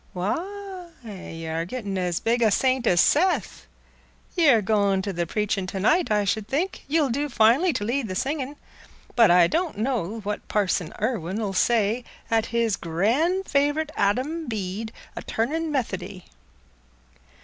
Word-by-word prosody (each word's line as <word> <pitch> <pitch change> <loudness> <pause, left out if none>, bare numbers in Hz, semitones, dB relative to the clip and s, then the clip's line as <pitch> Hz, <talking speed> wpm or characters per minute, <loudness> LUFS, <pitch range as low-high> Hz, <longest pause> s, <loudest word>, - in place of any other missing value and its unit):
"Why, 365 - -4 0.2
y' 185 -6 -8
are 160 +1 -2
gettin' 205 0 -5
as 180 -2 -1
big 235 +1 +1
a 225 - +5
saint 255 +3 +1
as 175 - +4
Seth. 360 +5 +1 0.7
Y' 340 -4 +4
are 235 -4 +6
goin' 200 -2 +2
to 200 - -3
th' 170 -1 -2
preachin' 210 -3 -1
to 190 - -4
night, 330 - +3
I 210 -1 +2
should 210 +1 -1
think. 320 +10 -2
Ye'll 295 -2 +2
do 290 +4 -1
finely 245 +9 +4
t' 225 -8 -2
lead 240 +2 -1
the 185 - -4
singin'. 280 +3 -2 0.6
But 230 -3 +6
I 175 0 +6
don' 330 - -1
know 225 -3 -1
what 205 0 -4
Parson 190 -5 0
Irwine 210 -4 -2
'ull 205 -3 -2
say 225 +3 +2 0.3
at 225 0 +2
his 230 -3 0
gran' 240 - +1
favright 290 0 0
Adam 265 +11 0
Bede 215 0 -4 0.2
a - - -5
turnin' 310 +8 -2
Methody." 200 -8 -3
225 Hz, 160 wpm, -25 LUFS, 195-285 Hz, 0.7 s, are